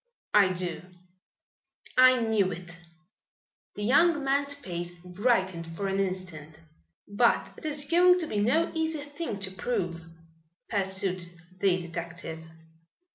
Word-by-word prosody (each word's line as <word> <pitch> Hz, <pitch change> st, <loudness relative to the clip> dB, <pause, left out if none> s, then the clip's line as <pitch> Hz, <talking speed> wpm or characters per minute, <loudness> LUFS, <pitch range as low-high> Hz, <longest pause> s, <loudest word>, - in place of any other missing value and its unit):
"I 200 Hz, -3 st, +6 dB
do." 175 Hz, -2 st, -3 dB, 1.1 s
"I 255 Hz, -1 st, +6 dB
knew 220 Hz, -4 st, +2 dB
it!" 175 Hz, 0 st, -8 dB, 1.0 s
The 205 Hz, -, -5 dB
young 300 Hz, +6 st, +4 dB
man's 280 Hz, +1 st, +1 dB
face 175 Hz, -9 st, -6 dB
brightened 185 Hz, -1 st, 0 dB
for 165 Hz, +4 st, -4 dB
an 195 Hz, 0 st, -1 dB
instant. 175 Hz, -5 st, -4 dB, 0.5 s
"But 220 Hz, +4 st, +2 dB
it 310 Hz, -, -7 dB
is 290 Hz, -1 st, -2 dB
going 360 Hz, +3 st, +5 dB
to -, -, -1 dB
be 210 Hz, -9 st, -2 dB
no 260 Hz, +11 st, +2 dB
easy 320 Hz, -2 st, -1 dB
thing 290 Hz, -7 st, -5 dB
to 190 Hz, -1 st, -4 dB
prove," 180 Hz, -5 st, -3 dB, 0.6 s
pursued 190 Hz, -3 st, -1 dB, 0.3 s
the 185 Hz, -1 st, +3 dB
detective. 170 Hz, -1 st, -6 dB
195 Hz, 125 wpm, -28 LUFS, 175-270 Hz, 1.1 s, I